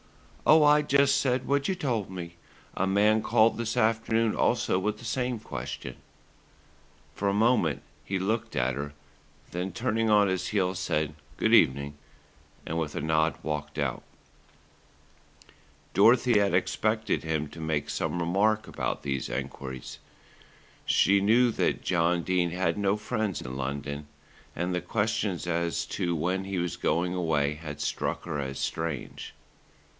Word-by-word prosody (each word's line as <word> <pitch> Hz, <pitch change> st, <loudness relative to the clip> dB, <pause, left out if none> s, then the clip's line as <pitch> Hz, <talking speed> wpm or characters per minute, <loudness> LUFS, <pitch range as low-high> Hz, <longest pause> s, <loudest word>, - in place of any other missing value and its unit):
"Oh, 155 Hz, 0 st, +7 dB
I 150 Hz, 0 st, +6 dB
just 140 Hz, -1 st, +3 dB
said 130 Hz, -1 st, 0 dB
what 140 Hz, 0 st, +1 dB
you 190 Hz, -, 0 dB
told 120 Hz, -, -2 dB
me. 85 Hz, -2 st, -7 dB, 0.4 s
A 95 Hz, -, 0 dB
man 105 Hz, +3 st, +3 dB
called 110 Hz, 0 st, +3 dB
this 115 Hz, -1 st, -2 dB
afternoon 115 Hz, 0 st, +2 dB
also 90 Hz, -, +1 dB
with 105 Hz, +2 st, -1 dB
the 120 Hz, -, -12 dB
same 125 Hz, 0 st, -1 dB
question." -, -, -6 dB, 1.2 s
For 100 Hz, -, -1 dB
a -, -, 0 dB
moment 105 Hz, -, +2 dB, 0.2 s
he 95 Hz, +6 st, -2 dB
looked 110 Hz, +4 st, -2 dB
at 65 Hz, 0 st, +1 dB
her, 70 Hz, +1 st, -5 dB, 0.6 s
then 90 Hz, +2 st, -3 dB
turning 115 Hz, +2 st, 0 dB
on 105 Hz, -1 st, +5 dB
his 95 Hz, -1 st, -1 dB
heel 95 Hz, -2 st, +1 dB
said 80 Hz, -5 st, -1 dB, 0.2 s
"good -, -, +2 dB
evening," 70 Hz, +1 st, +3 dB, 0.7 s
and 80 Hz, +1 st, -2 dB
with 75 Hz, -2 st, -3 dB
a -, -, -2 dB
nod 80 Hz, +1 st, +1 dB
walked 75 Hz, -1 st, -4 dB
out. 70 Hz, -4 st, -1 dB, 1.9 s
Dorothy 115 Hz, +3 st, +5 dB
had 100 Hz, -3 st, +2 dB
expected 110 Hz, +4 st, 0 dB
him 80 Hz, -1 st, -1 dB
to 80 Hz, -, -10 dB
make 80 Hz, -2 st, -1 dB
some 90 Hz, -, -2 dB
remark 100 Hz, +6 st, +1 dB
about -, -, -3 dB
these 70 Hz, -2 st, -2 dB
enquiries. 65 Hz, -1 st, -6 dB, 0.8 s
She 100 Hz, +1 st, +3 dB
knew 115 Hz, +4 st, +4 dB
that -, -, 0 dB
John 85 Hz, -1 st, +1 dB
Dene 90 Hz, -1 st, +1 dB
had 85 Hz, -1 st, 0 dB
no 100 Hz, 0 st, +2 dB
friends 110 Hz, -3 st, -2 dB
in 65 Hz, 0 st, -6 dB
London, 70 Hz, +2 st, -4 dB, 0.5 s
and 90 Hz, +2 st, -2 dB
the 90 Hz, -, -1 dB
questions 100 Hz, -1 st, -1 dB
as 85 Hz, -3 st, -1 dB
to 85 Hz, -1 st, -2 dB
when 90 Hz, +4 st, -1 dB
he 95 Hz, -1 st, -3 dB
was 90 Hz, -1 st, -1 dB
going 90 Hz, +2 st, 0 dB
away 80 Hz, -5 st, +1 dB
had 75 Hz, -1 st, -8 dB
struck 75 Hz, -, -2 dB
her 80 Hz, -4 st, -3 dB
as 65 Hz, -1 st, -4 dB
strange. 80 Hz, -3 st, -4 dB
90 Hz, 150 wpm, -28 LUFS, 80-110 Hz, 1.9 s, Oh